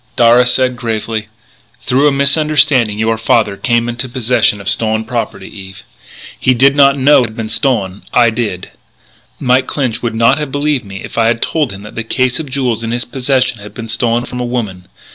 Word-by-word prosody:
Darragh 120 +1 +5
said, 125 0 +1
gravely: 110 -2 -3 0.6
"Through 135 +4 +2
a - - +3
misunderstanding 140 -5 +2
your 110 0 0
father 110 -2 +1
came 115 +4 0
into 120 +2 -4
possession 120 -4 +1
of 100 - -10
stolen 110 +1 0
property, 115 -3 -4
Eve. 95 -2 -11 0.6
He 130 - +2
did 135 +3 +4
not 140 -1 +5
know 140 +2 +5
it 125 - +2
had 110 - -12
been 110 -1 -5
stolen. 110 -5 -1
I 120 -2 +4
did. 110 -6 -4 0.7
But - - -7
Mike 130 +1 +3
Clinch 125 -5 -2
would 115 -2 -3
not 115 +5 +3
have 150 -3 -4
believed 145 -3 -1
me 95 -1 -9
if - - -5
I 115 - +3
had 115 0 +1
told 150 -2 -1
him 100 +1 -9
that 105 - -11
the 115 - -4
case 130 +3 0
of 155 -4 -6
jewels 130 -4 -1
in 115 - -4
his 120 +1 -2
possession 130 -2 -1
had 105 +1 -12
been 115 -1 -7
stolen 120 +1 0
from 125 - -7
a - - -2
woman.... 105 -7 -4
120 Hz, 205 wpm, -14 LUFS, 110-130 Hz, 0.7 s, Darragh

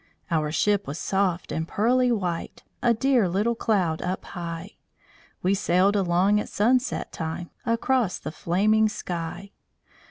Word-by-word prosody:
Our 155 -2 +1
ship 200 +4 +1
was 145 - -4
soft 190 -1 -1
and 160 0 -2
pearly 245 +6 +2
white 180 -7 -3 0.2
A 240 - +4
dear 240 -4 +2
little 205 +6 +1
cloud 190 -9 0
up 185 +1 -3
high. 170 -2 -7 0.7
We 185 +2 +3
sailed 195 +1 +2
along 190 +2 +3
at - - -4
sunset 250 +5 +1
time, 165 +1 -5 0.2
Across 230 -3 +1
the 155 - -6
flaming 215 +7 +2
sky. 175 +1 -5
195 Hz, 135 wpm, -25 LUFS, 170-220 Hz, 0.7 s, A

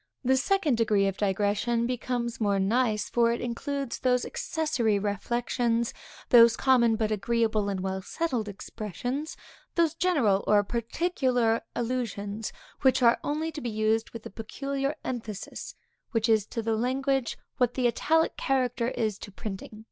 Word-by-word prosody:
The 260 +1 +4
second 300 -2 +2
degree 210 -3 +3
of 195 -1 0
digression 205 +4 +1
becomes 245 -1 -2
more 200 -2 +2
nice, 215 +2 +1
for 235 -1 +3
it 235 - -1
includes 270 +2 -3
those 250 -1 +2
accessory 255 -10 0
reflections, 235 +3 -1 0.4
those 230 -2 +7
common 240 -4 +4
but 220 -1 -1
agreeable 215 0 +1
and 195 -2 -2
well 190 0 -2
settled 245 - -2
expressions; 235 - -5 0.4
those 335 -3 +3
general 285 - +2
or 205 -1 +5
particular 240 - 0
allusions, 225 -4 -3 0.3
which 260 -1 +4
are 235 0 +5
only 310 +2 -1
to 300 - -7
be 240 - -3
used 220 +1 +1
with 230 -2 -10
a - - -7
peculiar 275 +6 -3
emphasis, 220 -5 -6 0.4
which 225 0 +2
is 220 -3 +3
to 230 - -4
language 255 +3 0 0.2
what 245 -1 +1
the 255 - 0
italic 320 +7 +2
character 250 -3 0
is 220 -5 -1
to 205 - -9
printing. 210 +1 -7
235 Hz, 145 wpm, -28 LUFS, 215-255 Hz, 0.4 s, those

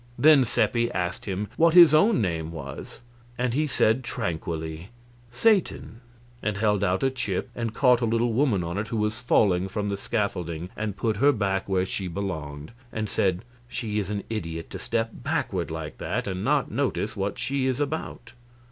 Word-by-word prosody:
Then 150 -3 +6
Seppi 120 0 +1
asked 90 -1 -2
him 100 +1 -3
what 165 +1 +4
his 170 -4 +9
own 200 - +5
name 80 -3 -2
was, 70 - -8 0.4
and 125 -1 0
he 150 +4 +1
said, 130 -2 +2
tranquilly, 85 -6 -4 0.4
"Satan," 165 - +1 0.4
and 105 -1 -1
held 105 -2 +2
out 90 +5 +1
a 135 - +3
chip 105 -8 -3
and 115 -2 -3
caught 125 -2 +4
a - - +2
little 115 +1 +1
woman 115 -7 +2
on 85 +4 -3
it 110 - -3
who 115 - -3
was 105 +3 -1
falling 95 -6 +3
from 105 +1 -3
the 100 - -2
scaffolding 90 -6 -2
and 105 -2 -3
put 110 -1 0
her 140 +6 +5
back 100 -5 -1
where 95 -1 +2
she 95 0 -3
belonged, 80 -5 -5 0.2
and 110 -1 -3
said, 95 +1 0 0.2
"She 110 -4 -3
is 100 - -3
an 105 -1 -3
idiot 80 -7 -5
to - - -6
step 115 0 -1
backward - - -2
like - - -6
that - - -2
and 95 -1 -3
not - - +1
notice - - -1
what - - -2
she 135 -1 -1
is 130 0 0
about." 150 +2 -4
105 Hz, 185 wpm, -26 LUFS, 90-120 Hz, 0.4 s, his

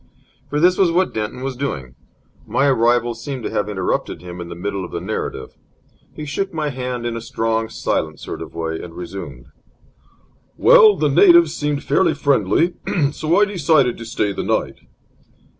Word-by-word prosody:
For 145 - -1
this 180 +3 +4
was 185 -3 +4
what 185 +2 +1
Denton 110 +4 -4
was 135 -1 -3
doing. 95 - -4 0.5
My 140 - +1
arrival 120 -2 +2
seemed 125 +2 -6
to - - -3
have 105 0 -1
interrupted 95 -5 -2
him 90 0 -8
in 85 - -8
the 85 - -7
middle 100 +2 -4
of 90 - -9
narrative. - - -4 0.6
He 150 - -6
shook 195 +7 -3
my 155 -3 -2
hand 125 -2 -4
in 120 -1 -2
a 115 - -5
strong, 115 0 -1
silent 80 -7 -2
sort - - -7
of - - -9
way, 80 -1 -3
and 85 -1 -10
resumed: 85 -8 -8 1.1
"Well, 475 -4 +7
the - - +1
natives 345 -4 +6
seemed 145 -1 -2
fairly 160 - +2
friendly, 140 - +2 0.4
so 155 +5 +1
I 210 - +5
decided 155 - +2
to 115 - -7
stay 105 -2 -1
the - - -3
night." - - -1
120 Hz, 175 wpm, -20 LUFS, 100-150 Hz, 1.1 s, Well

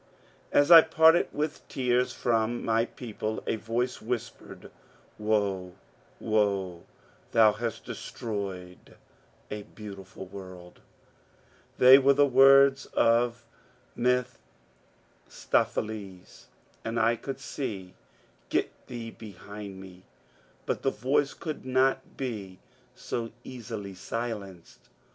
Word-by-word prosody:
As 145 +4 +4
I 165 -1 +12
parted 160 +1 +5
with 150 +1 -3
tears 125 -1 +1
from 120 0 0
my 115 0 +2
people, 110 -3 -5
a - - 0
yoice 115 +3 -2
whispered, 120 0 -6 0.2
«« - - -31
Woe, 100 -4 0 0.5
woe, 100 -5 0 0.5
thou 110 -2 +6
hast 115 +1 -5
destroyed 95 -5 -6 0.6
a 105 - -4
beautiful 100 -2 -10
world 95 -2 -11
I - - -27 0.5
" - - -33
They 130 +2 +9
were 140 +1 +5
the 145 +1 +5
words 135 +1 +6
of 120 0 +2 0.5
Mephistopheles, 95 - -4 0.4
and 115 +1 -2
I 115 +1 +3
could 135 +3 -6
say, 135 0 -5
^^ 95 -3 -8 0.6
Get - - 0 0.2
thee 115 -2 -6
behind 100 -2 -10
me; 95 -1 -12 0.3
'* - - -33
but - - -2
the 135 - +1
yoice 140 +2 0
could 155 -2 -5
not 130 +1 0
be 105 -8 -5 0.4
so 115 -1 -4
easily 110 -5 -7
silenced. 100 -2 -6
115 Hz, 110 wpm, -28 LUFS, 100-125 Hz, 0.6 s, I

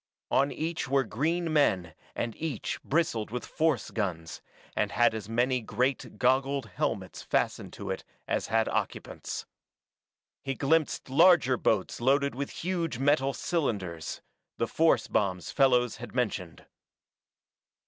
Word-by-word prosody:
On 140 +1 +3
each 160 -2 -3
were 135 0 +3
green 160 +6 -1
men 95 - +2 0.2
and 115 -2 -2
each 155 -8 -3
bristled 140 -8 0
with 125 +2 -4
force 155 -8 0
guns, 85 -7 -3 0.3
and - - 0
had 120 +1 +4
as 110 -1 -6
many 125 +2 +1
great 125 +4 -1
goggled 135 +1 +2
helmets 95 -5 -3
fastened - - -1
to - - -5
it - - -4 0.2
as - - -1
it - - -15
had 115 0 +2
occupants. - - -3 1.0
He 135 -1 -3
glimpsed 145 -1 +1
larger 160 -4 +6
boats 110 -2 0
loaded 140 +3 +3
with 140 +3 -3
huge 170 -6 -2
metal 135 0 +3
cylinders 100 - -2 0.3
the - - +1
force 160 -8 +2
bombs 95 -3 0
Fellows 125 -4 +3
had 120 +2 -9
mentioned. 100 -9 -2
130 Hz, 135 wpm, -29 LUFS, 110-145 Hz, 1.0 s, larger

